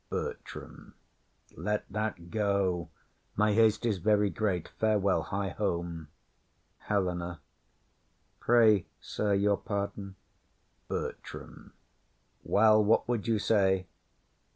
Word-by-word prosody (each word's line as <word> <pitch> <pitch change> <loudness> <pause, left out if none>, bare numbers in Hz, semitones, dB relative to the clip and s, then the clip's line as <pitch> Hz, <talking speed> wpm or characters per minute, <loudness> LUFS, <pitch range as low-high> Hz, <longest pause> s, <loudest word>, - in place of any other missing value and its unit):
BERTRAM. - - -7 0.6
Let 105 0 -2
that 105 -5 -3
go. 100 -6 0 0.5
My 105 0 +3
haste 110 0 +3
is 105 -5 0
very 105 +1 +2
great. 95 -6 -1
Farewell; 105 -3 +1
hie 100 0 -3
home. 85 -5 -3 0.8
HELENA. 90 -4 -1 1.0
Pray, 110 -6 +4
sir, 105 -1 -1
your 100 0 +2
pardon. 100 -2 -4 0.7
BERTRAM. - - -7 0.7
Well, 110 0 +5
what 110 +2 +3
would 120 -3 -1
you 115 -1 +2
say? 95 -3 +2
100 Hz, 95 wpm, -30 LUFS, 95-110 Hz, 1.0 s, Well